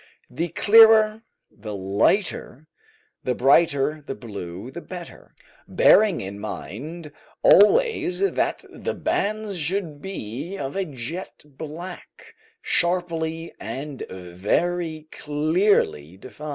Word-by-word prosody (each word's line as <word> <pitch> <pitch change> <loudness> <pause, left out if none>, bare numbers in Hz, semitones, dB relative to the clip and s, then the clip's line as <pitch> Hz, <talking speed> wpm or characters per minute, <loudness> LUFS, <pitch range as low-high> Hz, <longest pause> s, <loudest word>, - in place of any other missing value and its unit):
The 165 +8 -2
clearer, 220 +3 +6 0.3
the 105 -1 -8
lighter, 120 - 0 0.6
and 125 -1 -1
brighter 145 +2 +3
the 135 - -6
blue 100 0 -8
the 170 - -8
better, 175 -2 -10 0.3
bearing 210 -5 +4
in 100 +1 -7
mind 150 - -7 0.3
always 360 - +5
that 395 - 0
the - - -4
bands 210 -2 -2
should 160 -2 -2
be 165 - -6
of 135 -1 -5
a 195 -1 -1
jet 150 +5 -7
black, 160 +5 -10 0.3
sharply 170 -2 -1
and 140 0 -6
very 155 - -2
clearly 150 - 0
defined. 150 +8 -9
155 Hz, 100 wpm, -23 LUFS, 130-185 Hz, 0.6 s, clearer